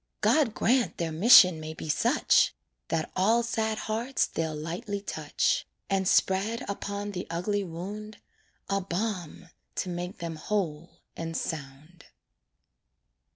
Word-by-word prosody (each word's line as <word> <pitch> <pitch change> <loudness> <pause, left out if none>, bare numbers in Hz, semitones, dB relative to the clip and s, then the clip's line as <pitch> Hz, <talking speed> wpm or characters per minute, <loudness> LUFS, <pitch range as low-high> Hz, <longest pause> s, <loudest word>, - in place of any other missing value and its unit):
God 280 -9 +3
grant 250 0 +2
their 165 -1 -2
mission 180 -1 +7
may 155 0 -6
be - - -7
such! 150 - +3 0.3
That 160 -1 -2
all 220 +6 +3
sad 220 -2 -1
hearts 230 +6 -1
they'll 160 -1 -3
lightly 180 +7 -4
touch, 200 - -1 0.2
And 190 -1 +1
spread 200 +6 +2
upon 200 +1 -4
the 180 -2 -5
ugly 200 +5 -1
wound 200 +5 -7 0.5
A 195 0 0
balm 185 -3 -4 0.3
to 185 - -2
make 175 +1 -5
them 165 -2 -5
whole 170 -3 -2 0.3
and 165 0 -4
sound. 155 +2 -6
185 Hz, 125 wpm, -28 LUFS, 165-210 Hz, 0.5 s, mission